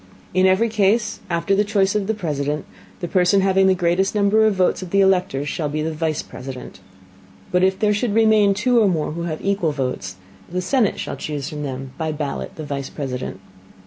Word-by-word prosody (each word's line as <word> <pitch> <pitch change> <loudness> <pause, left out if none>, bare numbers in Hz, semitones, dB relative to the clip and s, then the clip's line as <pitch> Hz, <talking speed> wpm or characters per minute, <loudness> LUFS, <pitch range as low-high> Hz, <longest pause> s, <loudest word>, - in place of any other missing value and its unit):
In 185 +1 +4
every 190 +5 +3
Case, 215 0 +1
after 170 +3 0
the 200 +1 +3
Choice 200 -2 +1
of 210 -2 -1
the 220 - 0
President, 150 -5 -2 0.4
the 175 - -2
Person 185 +2 +3
having 190 0 +3
the 190 - +4
greatest 180 +3 +1
Number 210 +2 +4
of 210 - +1
Votes 185 0 +1
of 185 - -7
the 200 - +2
Electors 180 -8 +2
shall 150 0 -2
be 155 +1 -2
the 160 +1 -2
Vice 155 -1 -2
President. 125 -5 -9 0.7
But 180 0 +2
if 190 0 +3
there 210 0 +2
should 210 0 -1
remain 215 -3 +4
two 240 +4 +3
or 215 - +4
more 160 -6 0
who 170 +2 -4
have 160 0 -5
equal 195 -6 +1
Votes, 125 -9 -3 0.4
the 180 - -1
Senate 215 +3 +1
shall - - -4
chuse 145 -3 -4
from 150 -1 -6
them 135 -2 -5
by 160 -1 -1
Ballot 150 -2 -4
the 155 - -7
Vice 140 -2 -4
President. 130 -3 -5
180 Hz, 210 wpm, -21 LUFS, 150-200 Hz, 0.7 s, In